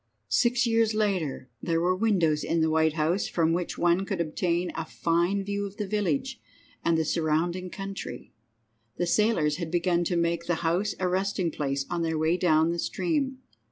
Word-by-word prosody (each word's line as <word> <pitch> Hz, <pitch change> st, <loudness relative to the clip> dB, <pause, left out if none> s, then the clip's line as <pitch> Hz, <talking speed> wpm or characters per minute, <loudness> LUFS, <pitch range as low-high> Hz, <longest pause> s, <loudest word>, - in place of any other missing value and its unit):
VI. 110 Hz, -2 st, -48 dB
Six 245 Hz, +1 st, +3 dB
years 225 Hz, -1 st, +2 dB
later 185 Hz, -12 st, -1 dB
there 165 Hz, -1 st, 0 dB
were 180 Hz, +2 st, +2 dB
windows 180 Hz, -8 st, +2 dB
in 165 Hz, -, 0 dB
the 160 Hz, 0 st, +2 dB
White 160 Hz, -1 st, +3 dB
House 165 Hz, +5 st, 0 dB
from 165 Hz, -1 st, +1 dB
which 175 Hz, 0 st, -2 dB
one 175 Hz, +2 st, +2 dB
could 195 Hz, -, -3 dB
obtain 170 Hz, +2 st, -1 dB
a -, -, -3 dB
fine 170 Hz, +5 st, 0 dB
view 200 Hz, 0 st, -2 dB
of 200 Hz, -, -13 dB
the 210 Hz, -, -2 dB
village 235 Hz, +6 st, -1 dB, 0.4 s
and 170 Hz, -1 st, +2 dB
the 160 Hz, -, +1 dB
surrounding 170 Hz, +3 st, 0 dB
country. 195 Hz, -, -7 dB, 0.6 s
The 175 Hz, -, 0 dB
sailors 170 Hz, -6 st, +2 dB
had 170 Hz, -2 st, -4 dB
begun 175 Hz, 0 st, +1 dB
to 175 Hz, -, 0 dB
make 170 Hz, 0 st, 0 dB
the 175 Hz, -, +2 dB
House 180 Hz, +6 st, +1 dB
a 185 Hz, -, +1 dB
resting 185 Hz, -1 st, 0 dB
place 140 Hz, -2 st, -2 dB
on 170 Hz, -, -2 dB
their 160 Hz, -1 st, 0 dB
way 160 Hz, +2 st, +2 dB
down 160 Hz, -2 st, +3 dB
the 170 Hz, -, -3 dB
stream. 265 Hz, -, -1 dB
175 Hz, 190 wpm, -27 LUFS, 160-195 Hz, 0.6 s, Six